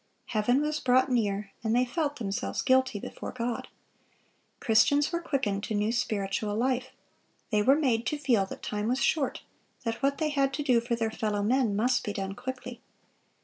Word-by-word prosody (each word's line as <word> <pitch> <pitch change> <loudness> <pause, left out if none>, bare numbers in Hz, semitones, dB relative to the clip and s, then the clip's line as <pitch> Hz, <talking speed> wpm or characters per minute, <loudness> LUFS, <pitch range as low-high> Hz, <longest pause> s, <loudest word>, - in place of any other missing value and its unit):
Heaven 245 +6 +2
was 305 0 -1
brought 260 0 +3
near, 205 -4 0
and 225 0 +1
they 250 +1 +3
felt 295 +2 -1
themselves 200 -6 -3
guilty 260 -5 +3
before - - -7
God."(568) 240 -1 -9
Christians 285 +7 +3
were 340 0 -1
quickened 220 -11 -1
to 215 - -3
new 210 +2 +1
spiritual 205 -3 -1
life. 255 +2 0 0.6
They 210 -1 +3
were 265 +6 +5
made 245 -6 +1
to 300 - 0
feel 240 -9 +2
that - - -9
time 210 0 -2
was 250 +2 +1
short, 285 -2 0 0.4
that 230 -1 -3
what 275 +1 +1
they 310 -1 0
had 275 -2 +1
to 295 - -2
do 250 -4 +3
for 235 0 -1
their 225 -1 -1
fellow 210 -2 -1
men 235 -1 +2
must 250 +4 +2
be 205 - -3
done 195 -1 -3
quickly. 250 +1 -7
240 Hz, 185 wpm, -28 LUFS, 210-270 Hz, 0.6 s, were